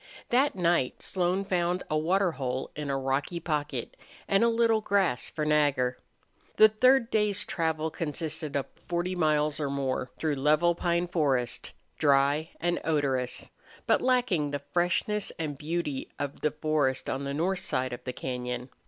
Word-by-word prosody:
That 265 +2 +3
night 170 -7 +1
Slone 185 +1 0
found 180 -1 0
a 155 - -1
water 180 +4 +2
hole 130 -3 -3
in 150 -1 -4
a 135 - 0
rocky 135 +6 -1
pocket 150 -6 -3 0.3
and 195 +2 +3
a - - +5
little 230 -1 +3
grass 195 - +1
for 150 - -3
Nagger. 145 -5 +2 0.6
The 215 - +8
third 250 +2 +3
day's 210 -2 +2
travel 160 -2 -1
consisted 155 -1 -3
of 140 - 0 0.2
forty 175 +1 -1
miles 155 -3 +1
or 145 -2 -1
more 135 -2 -2
through 155 -3 -1
level 155 +5 +3
pine 170 +1 0
forest, 140 -8 0 0.3
dry 145 +2 +3
and 175 +1 0
odorous, 135 -5 -1 0.3
but - - +3
lacking 245 - +2
the 145 -1 -4
freshness 180 +4 +1
and 155 -3 -3
beauty 150 -2 -3
of 145 0 -5
the 150 - +2
forest 150 -3 0
on 135 +1 -2
the 140 0 -3
north 180 +4 0
side 130 -9 -1
of 120 - -7
the 125 - -3
cañon. 125 0 -4
155 Hz, 160 wpm, -28 LUFS, 140-180 Hz, 0.6 s, The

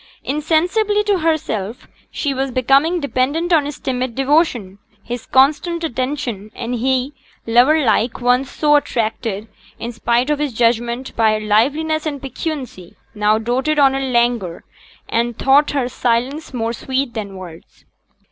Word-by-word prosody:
Insensibly 355 +9 +1
to 405 -3 +1
herself 250 - -2 0.2
she 285 -2 -2
was 270 +1 -2
becoming 275 +7 +2
dependent 290 +5 0
on 305 -3 +4
his 290 0 -5
timid 255 -2 -3
devotion, 265 - +1 0.2
his 240 -1 -6
constant 305 +6 +2
attention; 255 -7 -3
and 235 +1 -4
he, 260 +3 0 0.3
lover 260 +6 +4
like, 230 +1 +1
once 250 +2 +2
so 295 -1 +2
attracted, 225 -5 -2 0.3
in 235 - -5
spite 240 +4 0
of 295 - 0
his 295 -4 -2
judgment, 235 +2 0
by 220 -1 +3
her 215 0 -3
liveliness 300 +9 +1
and 285 -2 -3
piquancy, 265 - -6 0.2
now 210 0 +2
doted 255 +7 -1
on 275 -2 +5
her 270 - -1
languor, 240 -8 0 0.4
and 235 0 -1
thought 280 +2 +4
her 275 -4 0
silence 250 +5 -1
more 230 -2 -2
sweet 260 +1 -2
than 205 -4 -5
words. 175 -3 -12
255 Hz, 145 wpm, -19 LUFS, 230-295 Hz, 0.4 s, on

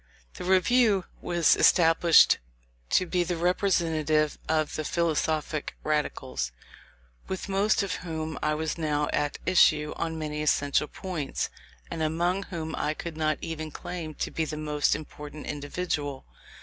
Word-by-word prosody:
The - - -8
Review 195 +2 +3 0.2
was 170 -3 +3
established 165 -1 +6 0.5
to 185 - +3
be 180 0 +1
the 175 0 -2
representative 160 -4 +1
of 155 -1 +1
the 155 - -2
"philosophic 155 -2 -1
Radicals," 145 - -1 0.8
with 190 +1 -4
most 200 +2 +2
of 195 - -2
whom 160 -2 -5
I 150 0 +1
was 160 +1 -3
now 150 -2 0
at 145 -1 0
issue 155 -4 +4
on 160 -1 -2
many 150 -1 -3
essential 145 0 +2
points, 170 -7 -4 0.4
and 165 - -3
among 170 +4 +1
whom 160 -3 -5
I 155 - -1
could 170 0 -6
not 155 -1 0
even 160 -1 -4
claim 160 0 -6
to - - -3
be 165 - -1
the 155 -1 -4
most 150 -1 +1
important 150 0 -8
individual. 145 -1 -3
160 Hz, 140 wpm, -27 LUFS, 150-175 Hz, 0.8 s, established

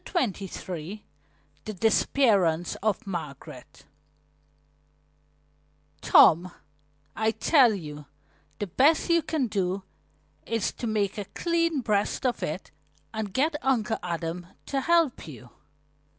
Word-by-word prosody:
CHAPTER 210 - -2
XXIII 180 +3 -7 0.6
THE 215 - -4
DISAPPEARANCE 200 - +2
OF 215 0 -1
MARGARET 150 -8 -8 2.2
"Tom, 175 +3 +6 0.6
I 220 0 +1
tell 245 -1 +4
you 150 -5 -8 0.5
the 205 - -2
best 290 - +3
you 335 0 +4
can 305 -4 -1
do 195 -3 -2 0.6
is 225 -3 0
to 240 - -5
make 210 -2 -1
a 205 - -4
clean 335 - 0
breast 210 +1 0
of 250 - 0
it - - -4 0.4
and 220 -2 -4
get 290 +9 +1
Uncle 230 -4 0
Adam 170 0 -4 0.2
to 275 -1 -1
help 335 - +2
you." 125 -5 -11
210 Hz, 110 wpm, -27 LUFS, 180-260 Hz, 2.2 s, Tom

